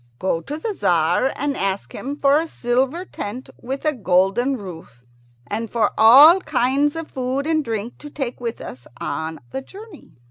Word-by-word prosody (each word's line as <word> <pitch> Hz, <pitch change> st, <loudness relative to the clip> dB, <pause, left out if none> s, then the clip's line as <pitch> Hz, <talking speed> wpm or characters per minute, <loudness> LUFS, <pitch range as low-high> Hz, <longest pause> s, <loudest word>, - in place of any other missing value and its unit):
Go 165 Hz, 0 st, -1 dB
to 290 Hz, -, -6 dB
the 320 Hz, -, -4 dB
Tzar 175 Hz, -, +2 dB
and 285 Hz, 0 st, -2 dB
ask 195 Hz, -2 st, -3 dB
him 280 Hz, +2 st, -5 dB
for 280 Hz, -1 st, +3 dB
a 325 Hz, +2 st, -1 dB
silver 265 Hz, +6 st, -1 dB
tent 240 Hz, -, -7 dB
with 270 Hz, +4 st, -5 dB
a 305 Hz, -, +2 dB
golden 205 Hz, +4 st, +1 dB
roof, 165 Hz, -, -11 dB, 0.4 s
and 225 Hz, -, -4 dB
for 225 Hz, -3 st, +1 dB
all 280 Hz, +11 st, +8 dB
kinds 285 Hz, -2 st, +1 dB
of 325 Hz, -1 st, -5 dB
food 260 Hz, +2 st, -2 dB
and 315 Hz, -1 st, +1 dB
drink 225 Hz, -1 st, -5 dB
to 295 Hz, -, -10 dB
take 265 Hz, -4 st, -5 dB
with 235 Hz, -1 st, -4 dB
us 125 Hz, -1 st, -10 dB
on 160 Hz, +2 st, -4 dB
the 265 Hz, -, -4 dB
journey." 390 Hz, +4 st, -13 dB
255 Hz, 175 wpm, -21 LUFS, 200-290 Hz, 0.4 s, all